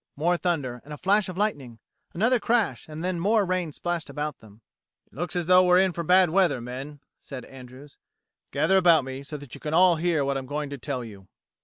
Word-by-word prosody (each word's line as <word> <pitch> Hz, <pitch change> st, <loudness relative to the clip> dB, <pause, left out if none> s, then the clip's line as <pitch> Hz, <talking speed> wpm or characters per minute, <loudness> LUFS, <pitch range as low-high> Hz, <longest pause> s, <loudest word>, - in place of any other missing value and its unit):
More 170 Hz, +5 st, +1 dB
thunder, 145 Hz, -9 st, -2 dB
and 150 Hz, -, -14 dB
a -, -, -13 dB
flash 195 Hz, +3 st, +1 dB
of 185 Hz, -, -7 dB
lightning. 145 Hz, -, -2 dB, 0.3 s
Another 235 Hz, +8 st, +2 dB
crash, 225 Hz, -, 0 dB
and 170 Hz, +3 st, -3 dB
more 210 Hz, +2 st, +2 dB
rain 180 Hz, -3 st, -1 dB
splashed 175 Hz, +2 st, -4 dB
about 150 Hz, -1 st, -4 dB
them. 110 Hz, 0 st, -18 dB, 0.4 s
"It -, -, -33 dB
looks 175 Hz, -, -4 dB
as 175 Hz, -1 st, -1 dB
though 185 Hz, +1 st, +6 dB
we're 180 Hz, 0 st, +5 dB
in 190 Hz, -1 st, +3 dB
for 170 Hz, -, -4 dB
bad 180 Hz, 0 st, +4 dB
weather, 180 Hz, -7 st, +2 dB
men," 135 Hz, +4 st, -8 dB, 0.2 s
said 130 Hz, -3 st, -9 dB
Andrews. 130 Hz, +2 st, -14 dB, 0.5 s
"Gather 190 Hz, -, +2 dB
about 170 Hz, -5 st, +5 dB
me 130 Hz, +1 st, -7 dB
so 145 Hz, +2 st, -7 dB
that 145 Hz, -4 st, -12 dB
you -, -, -10 dB
can 155 Hz, 0 st, -2 dB
all 180 Hz, -1 st, +5 dB
hear 160 Hz, -3 st, 0 dB
what 135 Hz, 0 st, -1 dB
I'm 130 Hz, -, -9 dB
going 145 Hz, +1 st, -4 dB
to 140 Hz, -, -5 dB
tell 130 Hz, -1 st, -4 dB
you." 100 Hz, -4 st, -12 dB
155 Hz, 215 wpm, -25 LUFS, 135-180 Hz, 0.5 s, though